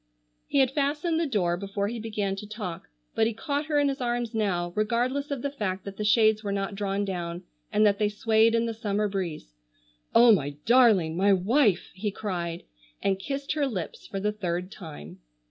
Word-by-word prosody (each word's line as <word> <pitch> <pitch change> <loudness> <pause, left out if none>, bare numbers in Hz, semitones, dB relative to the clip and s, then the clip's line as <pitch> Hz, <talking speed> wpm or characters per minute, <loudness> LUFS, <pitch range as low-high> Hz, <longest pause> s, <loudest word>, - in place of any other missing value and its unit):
He - - -1
had 265 -2 +4
fastened 295 +4 0
the 330 - 0
door 180 -9 +1
before 200 +1 -2
he 235 +2 -4
began 210 -3 -2
to 210 - -7
talk, 195 - -6 0.2
but 220 - +2
he 225 - -3
caught 285 +5 -2
her 300 -2 +1
in 290 -1 +3
his 275 -1 -2
arms 240 -1 -1
now, 180 -6 -1
regardless 245 +7 0
of 280 -4 -3
the 280 - -1
fact 195 -8 -3
that 200 -1 -7
the 210 - -2
shades 215 0 +4
were 200 - -2
not 200 +1 -2
drawn 200 0 -1
down, 175 -2 -4 0.3
and 215 0 +4
that 200 -1 +3
they 210 -1 +2
swayed 220 +2 +3
in 230 0 +2
the 230 - -2
summer 210 -2 -1
breeze. 175 - -4 0.6
"Oh, 235 0 +8
my 145 -8 +1
darling! 220 -10 +5
My 195 +3 +4
wife!" 205 - +2
he 200 +4 -2
cried, 175 -5 -4 0.4
and 195 -1 +1
kissed 275 +7 -4
her 295 -2 +1
lips 190 -10 -5
for 195 - -4
the 210 +2 0
third 180 -3 -3
time. 120 - -10
210 Hz, 200 wpm, -27 LUFS, 190-240 Hz, 0.6 s, Oh